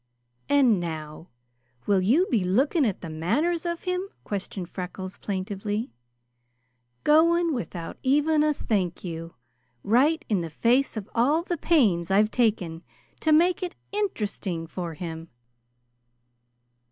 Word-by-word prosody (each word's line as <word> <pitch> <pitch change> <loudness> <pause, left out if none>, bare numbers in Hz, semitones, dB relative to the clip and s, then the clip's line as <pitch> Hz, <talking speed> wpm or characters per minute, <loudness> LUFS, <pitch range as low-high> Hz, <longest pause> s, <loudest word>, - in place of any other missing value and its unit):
"And 265 -8 +4
now 160 -1 -6 0.6
will 200 -2 +3
you 260 - +4
be 220 -7 +2
looking 265 - +2
at 200 - -3
the 170 - -6
manners 315 - 0
of 340 0 -3
him?" 365 +1 -2 0.2
questioned 195 -2 -5
Freckles 185 +1 -7
plaintively. 205 +3 -3 1.1
"Going 335 +2 +4
without 180 -9 -5
even 295 +3 +3
a 305 0 +3
'thank 195 - -1
you,' 165 -2 -6 0.5
right 295 +9 +3
in 205 -5 +1
the 165 - -4
face 240 - +2
of 210 -2 -5
all 285 +8 +2
the 350 - -2
pains 220 - +2
I've 210 +3 +3
taken 190 -9 0 0.4
to 315 - +1
make 345 +4 +4
it 360 -1 -4 0.2
interesting 210 - -2
for 170 -1 -5
him!" 165 0 -7
215 Hz, 130 wpm, -26 LUFS, -, 1.1 s, And